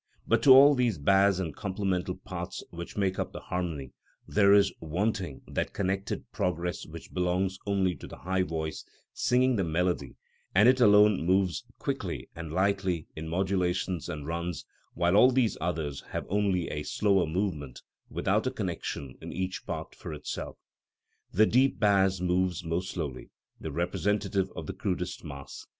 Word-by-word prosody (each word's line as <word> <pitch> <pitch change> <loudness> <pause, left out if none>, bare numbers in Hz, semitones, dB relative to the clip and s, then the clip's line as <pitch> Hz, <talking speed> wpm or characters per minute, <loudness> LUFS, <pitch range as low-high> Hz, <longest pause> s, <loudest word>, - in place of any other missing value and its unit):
But 115 0 +3
to 135 - +7
all 140 +3 +9
these 125 -7 +1
bass 95 +5 +4
and 85 -6 -3
complemental 95 -2 -2
parts 95 -1 -6
which 85 +3 -8
make 95 -2 0
up - - -3
the - - -6
harmony 80 -7 -4 0.3
there 100 -1 +4
is 100 -1 +5
wanting 90 -1 -2
that - - -3
connected 95 0 -2
progress 90 -1 -2
which - - -10
belongs 90 +1 0
only 95 -2 +2
to - - -9
the - - -10
high 95 +1 -1
voice 80 -3 -3 0.3
singing 125 0 +2
the 95 - +1
melody, 85 -4 -1 0.4
and 105 +5 +7
it 130 0 +5
alone 105 -3 +6
moves 95 0 +1
quickly - - -3
and 85 -2 -6
lightly 95 -2 0
in 80 +1 -6
modulations 90 -1 0
and 75 -1 -5
runs, 85 -2 -3 0.3
while 85 +2 +2
all 125 +5 +8
these 125 -5 +2
others 80 -4 -2
have - - -4
only 95 -3 +1
a 75 - -3
slower 95 +2 +2
movement 80 -7 -3 0.3
without - - 0
a - - 0
connection 70 -3 -4
in - - -7
each 95 +1 -4
part - - -5
for - - -7
itself. - - -6 0.7
The 110 +4 +5
deep 130 +4 +3
bass 95 -3 +3
moves 90 -1 0
most 85 +3 -2
slowly, 75 -8 -5 0.3
the 80 - -5
representative 95 +4 0
of - - -5
the 95 - -5
crudest 90 -1 -3
mass. 70 -4 -9
95 Hz, 160 wpm, -29 LUFS, 85-100 Hz, 0.7 s, all